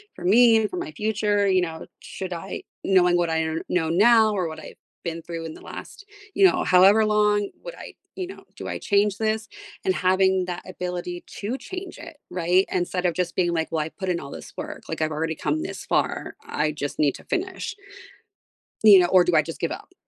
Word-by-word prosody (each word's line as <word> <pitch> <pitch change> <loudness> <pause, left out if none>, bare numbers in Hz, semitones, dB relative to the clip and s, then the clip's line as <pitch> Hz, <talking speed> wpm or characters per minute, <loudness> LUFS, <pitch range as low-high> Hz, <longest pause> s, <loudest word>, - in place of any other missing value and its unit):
for 175 - -8
me 230 +4 +6
and 220 -1 +1
for - - -4
my 155 - -4
future? 210 0 +1
You 185 -1 +3
know, 165 -2 -4
should 185 -1 -6
I, 175 +3 -6 0.2
knowing 180 -2 +4
what 175 -1 +1
I 160 0 +1
n 160 0 -2
know 165 -3 +1
now 220 +5 +5
or 185 -4 -1
what 160 0 -7
I've - - -11 0.3
been 165 -1 -4
through 165 0 -6
in 160 - -6
the - - -13
last, 405 - -10 0.3
you - - +2
know, - - -1
however 195 +4 +6
long, 210 -1 +2
would - - -7
I, - - -10 0.2
you 370 - -4
know 380 - -11
do - - -7
I - - -3
change 205 0 +2
this?" 220 0 -1 0.4
And 185 - +3
having 190 0 +2
that 180 -1 -5
ability 180 -1 -5 0.2
to 220 +6 -3
change 370 +6 -8
it, - - -11
right? 180 +2 +2
Instead 180 0 -1
of 175 - +2
just 175 +1 -2
being 175 -2 +1
like, 160 -1 -1
"Well, 160 -2 0
I - - -6
put 190 +3 -5
in 175 -1 0
all 140 - -9
this - - -10
work, - - -6
like. - - -4
I've 155 0 0
already 160 +1 -2
come 150 +1 -1
this - - -6
far, - - -1
I 150 0 0
just 145 -1 -5
need 145 -3 +2
to - - -12
finish" 375 0 -3 1.1
"you 205 -3 +9
know, 175 - +4
or 180 0 +5
do 175 -1 +1
I 155 - +6
just 165 +2 -8
give 165 - -1
up?" - - -8
180 Hz, 225 wpm, -24 LUFS, 165-210 Hz, 1.1 s, you